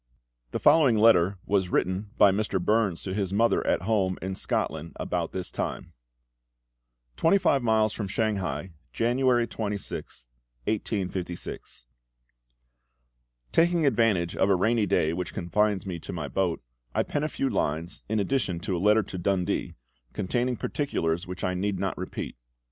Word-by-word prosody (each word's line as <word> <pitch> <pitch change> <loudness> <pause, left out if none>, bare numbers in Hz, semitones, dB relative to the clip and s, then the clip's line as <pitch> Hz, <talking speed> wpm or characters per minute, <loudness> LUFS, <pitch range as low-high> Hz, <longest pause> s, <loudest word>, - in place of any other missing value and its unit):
The - - -2
following 140 -9 +5
letter 100 -4 +5
was 95 -3 +1
written 95 +3 0
by 100 - +7
Mr. 100 -1 0
Burns 100 -1 +1
to 95 - -4
his 95 -2 -1
mother 115 +4 +2
at - - +1
home 95 -3 +1
in 95 +1 -4
Scotland 80 -3 -2
about - - -2
this 95 -1 -5
time: - - -4 1.2
"TWENTY 165 +5 +4
FIVE 140 -7 +2
MILES 110 -2 +2
FROM 105 - -4
SHANGHAI, 95 -6 -2 0.2
January 120 0 +2
26th, 105 - -5 0.4
1856. 90 - -3 1.7
"Taking 170 -1 +3
advantage 110 -9 +2
of 95 - +2
a 100 - +5
rainy 110 +3 +2
day 80 -4 +2
which 90 0 -4
confines 100 +2 +1
me 90 -3 -4
to - - -7
my 80 -5 -4
boat, 85 0 -1 0.3
I - - +3
pen 145 - -2
a - - +1
few 135 - -1
lines, 80 - -2
in 110 0 +1
addition 100 -6 0
to 95 -1 -2
a 85 - -2
letter 105 +2 +4
to 95 - -7
Dundee, 90 0 -1 0.4
containing 120 +5 -1
particulars 85 - -2
which 90 0 -7
I 90 - 0
need 95 +2 -1
not - - -1
repeat. - - -6
100 Hz, 150 wpm, -27 LUFS, 90-115 Hz, 1.7 s, by